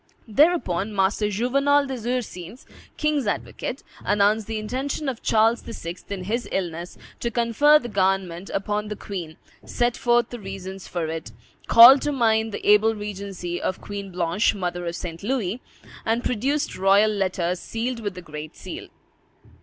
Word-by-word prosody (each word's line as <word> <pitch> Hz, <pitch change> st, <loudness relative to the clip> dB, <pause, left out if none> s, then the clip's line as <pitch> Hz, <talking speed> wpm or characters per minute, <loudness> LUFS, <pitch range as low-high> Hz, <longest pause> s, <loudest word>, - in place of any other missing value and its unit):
Thereupon 220 Hz, -, +2 dB
Master 200 Hz, +2 st, +1 dB
Juvenal 275 Hz, +7 st, +2 dB
des 255 Hz, -4 st, -5 dB
Ursins, 235 Hz, -4 st, -4 dB, 0.3 s
king's 300 Hz, -6 st, 0 dB
advocate, 245 Hz, +5 st, -3 dB, 0.2 s
announced 205 Hz, +1 st, +2 dB
the 225 Hz, -1 st, -3 dB
intention 260 Hz, +7 st, -3 dB
of 255 Hz, -4 st, -3 dB
Charles 225 Hz, +2 st, +3 dB
VI. 170 Hz, -7 st, -6 dB, 0.2 s
in 195 Hz, -2 st, -4 dB
his 225 Hz, +3 st, -2 dB
illness 175 Hz, -2 st, -3 dB, 0.2 s
to 235 Hz, -, -1 dB
confer 235 Hz, +6 st, +4 dB
the 245 Hz, -, -5 dB
government 190 Hz, -3 st, 0 dB
upon 210 Hz, +2 st, -2 dB
the 210 Hz, -, -4 dB
queen, 175 Hz, -7 st, -7 dB, 0.3 s
set 240 Hz, 0 st, 0 dB
forth 240 Hz, -1 st, +2 dB
the 240 Hz, -, -6 dB
reasons 195 Hz, -1 st, -7 dB
for 170 Hz, -2 st, -2 dB
it, 160 Hz, -7 st, -5 dB, 0.4 s
called 245 Hz, +4 st, +10 dB
to 295 Hz, -, 0 dB
mind 225 Hz, -4 st, +2 dB
the -, -, -5 dB
able 210 Hz, +2 st, +5 dB
regency 195 Hz, -4 st, -5 dB
of 185 Hz, -, -2 dB
Queen 200 Hz, -1 st, -6 dB
Blanche, 175 Hz, +4 st, +1 dB
mother 175 Hz, -2 st, -3 dB
of 170 Hz, -, -3 dB
St. 165 Hz, -2 st, -6 dB
Louis, 230 Hz, -1 st, -2 dB, 0.4 s
and 230 Hz, +2 st, 0 dB
produced 270 Hz, +6 st, -1 dB
royal 200 Hz, +3 st, +5 dB
letters, 185 Hz, -3 st, -1 dB
sealed 235 Hz, +4 st, -3 dB
with 205 Hz, -4 st, -4 dB
the 180 Hz, -, -9 dB
great 150 Hz, -1 st, -8 dB
seal. -, -, -8 dB
210 Hz, 155 wpm, -24 LUFS, 185-240 Hz, 0.4 s, called